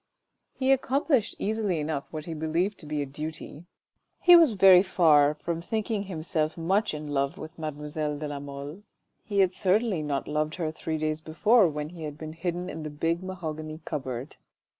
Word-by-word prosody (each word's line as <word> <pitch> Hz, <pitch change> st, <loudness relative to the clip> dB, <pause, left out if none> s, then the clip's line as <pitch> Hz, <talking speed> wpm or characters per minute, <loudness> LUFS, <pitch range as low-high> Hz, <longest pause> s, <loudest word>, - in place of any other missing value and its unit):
He 265 Hz, 0 st, +2 dB
accomplished 270 Hz, -2 st, +2 dB
easily 210 Hz, -5 st, -1 dB
enough 150 Hz, -2 st, -2 dB
what 155 Hz, -1 st, -6 dB
he 165 Hz, -, -5 dB
believed 165 Hz, +6 st, -1 dB
to 155 Hz, -, -10 dB
be 150 Hz, -1 st, -1 dB
a -, -, -4 dB
duty; 155 Hz, +3 st, -7 dB, 0.5 s
he 355 Hz, 0 st, +8 dB
was 325 Hz, -8 st, +6 dB
very 190 Hz, -2 st, +8 dB
far 155 Hz, -6 st, +4 dB
from 165 Hz, +2 st, -4 dB
thinking 215 Hz, +3 st, -2 dB
himself 160 Hz, -3 st, -2 dB
much 185 Hz, +2 st, +1 dB
in 150 Hz, 0 st, -6 dB
love 140 Hz, +3 st, -1 dB
with 165 Hz, -4 st, -9 dB
mademoiselle 150 Hz, 0 st, -3 dB
de 150 Hz, +1 st, -4 dB
la 145 Hz, -1 st, -5 dB
Mole. 140 Hz, +5 st, -8 dB, 0.4 s
He 200 Hz, -2 st, +1 dB
had 185 Hz, -1 st, +3 dB
certainly 195 Hz, -1 st, +1 dB
not 145 Hz, -2 st, -2 dB
loved 155 Hz, +1 st, -1 dB
her 165 Hz, -4 st, -2 dB
three 160 Hz, 0 st, -4 dB
days 155 Hz, 0 st, -2 dB
before, 205 Hz, +7 st, +4 dB
when 150 Hz, -1 st, -4 dB
he 170 Hz, -1 st, -11 dB
had 150 Hz, -2 st, -5 dB
been 155 Hz, 0 st, -7 dB
hidden 175 Hz, +2 st, -3 dB
in 160 Hz, -, -6 dB
the 155 Hz, -, -5 dB
big 165 Hz, +3 st, -1 dB
mahogany 155 Hz, -4 st, -6 dB
cupboard. 130 Hz, -3 st, -5 dB
160 Hz, 185 wpm, -27 LUFS, 150-185 Hz, 0.5 s, he